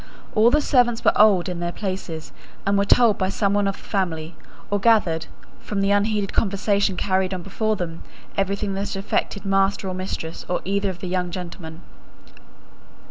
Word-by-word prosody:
All 220 Hz, +2 st, +5 dB
the 300 Hz, +4 st, +3 dB
servants 245 Hz, -5 st, +2 dB
were -, -, +5 dB
old 200 Hz, -5 st, +5 dB
in 180 Hz, -2 st, -4 dB
their 175 Hz, 0 st, -2 dB
places, 185 Hz, -5 st, -5 dB, 0.3 s
and 200 Hz, +1 st, +2 dB
were 200 Hz, 0 st, +2 dB
told 230 Hz, 0 st, +4 dB
by 190 Hz, -1 st, +1 dB
some 200 Hz, 0 st, 0 dB
one 205 Hz, -1 st, +2 dB
of 195 Hz, -, -2 dB
the -, -, -16 dB
family, 170 Hz, -5 st, -2 dB, 0.4 s
or 205 Hz, -, +2 dB
gathered, 195 Hz, -7 st, +3 dB, 0.3 s
from 205 Hz, -, -4 dB
the 195 Hz, 0 st, +2 dB
unheeded 205 Hz, 0 st, +1 dB
conversation 200 Hz, -1 st, +1 dB
carried 190 Hz, -1 st, 0 dB
on 180 Hz, -, -6 dB
before 215 Hz, +3 st, -1 dB
them, 170 Hz, -4 st, -5 dB, 0.3 s
everything 200 Hz, +1 st, -1 dB
that 195 Hz, +1 st, -3 dB
affected 200 Hz, +1 st, -2 dB
master 195 Hz, 0 st, +1 dB
or 185 Hz, -, -2 dB
mistress 180 Hz, -3 st, -5 dB
or 180 Hz, -, 0 dB
either 200 Hz, +1 st, 0 dB
of 185 Hz, -1 st, -7 dB
the 185 Hz, -, -4 dB
young 180 Hz, 0 st, -1 dB
gentlemen. 170 Hz, -2 st, -7 dB
195 Hz, 180 wpm, -23 LUFS, 180-205 Hz, 0.4 s, All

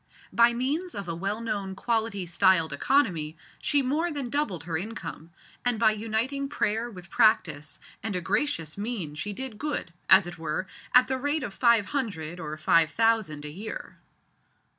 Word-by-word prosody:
By 235 Hz, 0 st, +6 dB
means 285 Hz, +9 st, -1 dB
of 200 Hz, -2 st, -4 dB
a 165 Hz, -, -2 dB
well 195 Hz, +6 st, -2 dB
known 200 Hz, -4 st, -3 dB
quality 220 Hz, -2 st, -1 dB
styled 170 Hz, -2 st, +3 dB
economy, 165 Hz, -, +1 dB, 0.2 s
she 285 Hz, -2 st, +2 dB
more 305 Hz, +7 st, +1 dB
than 280 Hz, -5 st, -4 dB
doubled 240 Hz, -, -1 dB
her 165 Hz, -1 st, -4 dB
income, 170 Hz, -3 st, -5 dB, 0.3 s
and 245 Hz, -2 st, +1 dB
by 220 Hz, 0 st, +5 dB
uniting 225 Hz, +6 st, -2 dB
prayer 230 Hz, -4 st, 0 dB
with 180 Hz, -5 st, -12 dB
practice 165 Hz, -10 st, +2 dB, 0.2 s
and 200 Hz, -2 st, -3 dB
a -, -, +1 dB
gracious 180 Hz, -, -1 dB
mien 205 Hz, -9 st, -3 dB
she 160 Hz, +8 st, -4 dB
did 235 Hz, 0 st, -6 dB
good, 295 Hz, -, -3 dB, 0.2 s
as 190 Hz, -, +8 dB
it 175 Hz, -1 st, -8 dB
were, 160 Hz, +3 st, -2 dB, 0.3 s
at 250 Hz, 0 st, +7 dB
the 265 Hz, 0 st, -1 dB
rate 290 Hz, +2 st, 0 dB
of 210 Hz, -, -5 dB
five 235 Hz, -3 st, +4 dB
hundred, 180 Hz, -, -3 dB
or 155 Hz, -2 st, -5 dB
five 160 Hz, +1 st, +4 dB
thousand, 220 Hz, -8 st, +1 dB
a 150 Hz, -, -5 dB
year. 205 Hz, +8 st, -7 dB
210 Hz, 170 wpm, -27 LUFS, 170-245 Hz, 0.3 s, as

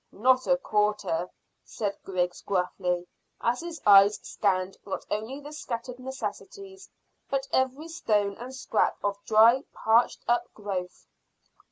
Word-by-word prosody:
"Not 255 Hz, +4 st, +2 dB
a 270 Hz, -, +4 dB
quarter," 210 Hz, -7 st, 0 dB, 0.3 s
said 205 Hz, -3 st, -3 dB
Griggs 180 Hz, -2 st, -2 dB
gruffly, 180 Hz, -2 st, -1 dB, 0.3 s
as 235 Hz, +2 st, 0 dB
his 340 Hz, -1 st, -6 dB
eyes 200 Hz, 0 st, +7 dB
scanned 190 Hz, -2 st, 0 dB
not 195 Hz, -, -5 dB
only 220 Hz, +6 st, -3 dB
the 295 Hz, +1 st, -10 dB
scattered 250 Hz, -3 st, -5 dB
necessities, 385 Hz, +9 st, -7 dB, 0.4 s
but 275 Hz, 0 st, -1 dB
every 260 Hz, +4 st, 0 dB
stone 210 Hz, -11 st, 0 dB
and 250 Hz, +2 st, -8 dB
scrap 240 Hz, -4 st, 0 dB
of 200 Hz, 0 st, -2 dB
dry, 230 Hz, +5 st, +6 dB
parched 225 Hz, +2 st, +2 dB
up 240 Hz, 0 st, +1 dB
growth. 190 Hz, -4 st, -5 dB
220 Hz, 130 wpm, -27 LUFS, 200-260 Hz, 0.4 s, eyes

